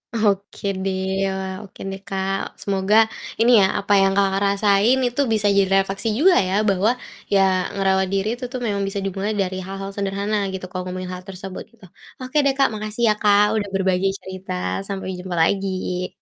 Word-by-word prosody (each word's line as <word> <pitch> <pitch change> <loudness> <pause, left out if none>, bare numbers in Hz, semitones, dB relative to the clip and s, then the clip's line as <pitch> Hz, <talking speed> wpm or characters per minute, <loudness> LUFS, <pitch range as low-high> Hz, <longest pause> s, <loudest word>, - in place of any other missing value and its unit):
Oke 205 -2 0 0.2
deh 190 -1 -1 0.2
ya, 195 - +1 0.3
oke 195 - -16
deh, 195 - -6
Kak, 195 0 -1 0.2
semoga 195 +1 +1 0.5
ini 240 +2 +5
ya, 190 - +5
apa 200 +1 -4
yang, 195 0 +4
Kakak, 195 -1 +2
rasain 200 +4 +3
itu 245 +4 -1
bisa 210 -1 +2
jadi 195 -1 +3
refleksi 195 +4 -4
juga 365 +3 +6
ya. 185 - -2 0.2
Bahwa 200 +4 +3 0.4
ya 195 - +5 0.3
ngerawat 190 -1 +2
diri 195 +2 0
itu - - -9
tuh 255 - -4
memang 200 -1 -1
bisa 195 0 -3
dimulai 195 +3 -2
dari 185 0 -2
hal-hal 195 0 -5
sederhana 200 +1 -2 0.2
gitu 190 - -5
kalau 185 -1 -4
ngomongin 185 0 -5
hal 180 0 -7
tersebut, 190 0 -7
gitu. 225 -4 -18 0.4
Oke 255 +4 -3
deh, 275 - +3
Kak, 275 - +4
makasih 215 +2 -4
ya, - - +5
Kak, 205 -1 +5 0.2
udah 205 - -3
berbagai 190 0 +1
cerita, 185 0 -7 0.3
sampai 195 -1 -5
jumpa 180 -1 -5
lagi! 185 -1 -1
195 Hz, 180 wpm, -22 LUFS, 190-205 Hz, 0.5 s, juga